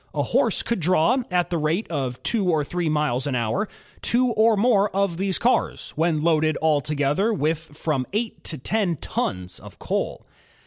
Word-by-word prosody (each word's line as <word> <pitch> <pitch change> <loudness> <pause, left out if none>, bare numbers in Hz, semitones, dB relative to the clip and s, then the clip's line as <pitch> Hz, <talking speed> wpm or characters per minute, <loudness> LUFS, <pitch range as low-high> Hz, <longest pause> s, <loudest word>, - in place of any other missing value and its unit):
A - - +1
horse - - +1
could 235 - -1
draw, 180 - +3
at 180 -1 0
the 170 - 0
rate 160 +8 0
of 130 -5 -3
two 210 -6 +1
or 155 -3 +2
three 170 +2 -2
miles 150 -4 0
an 135 - -1
hour, 120 - -1 0.3
two 245 +1 +2
or 220 -1 +3
more 210 -2 +3
of 195 -4 +1
these 190 0 0
cars, 245 - 0
when 160 -1 +1
loaded 155 -1 +2
altogether 150 - +1
with 160 -6 0 0.2
from 145 -6 -1
eight 220 +3 -3
to 155 - -4
ten 190 - 0
tons 90 -9 -3
of - - -13
coal. - - -3
165 Hz, 175 wpm, -23 LUFS, 150-200 Hz, 0.3 s, draw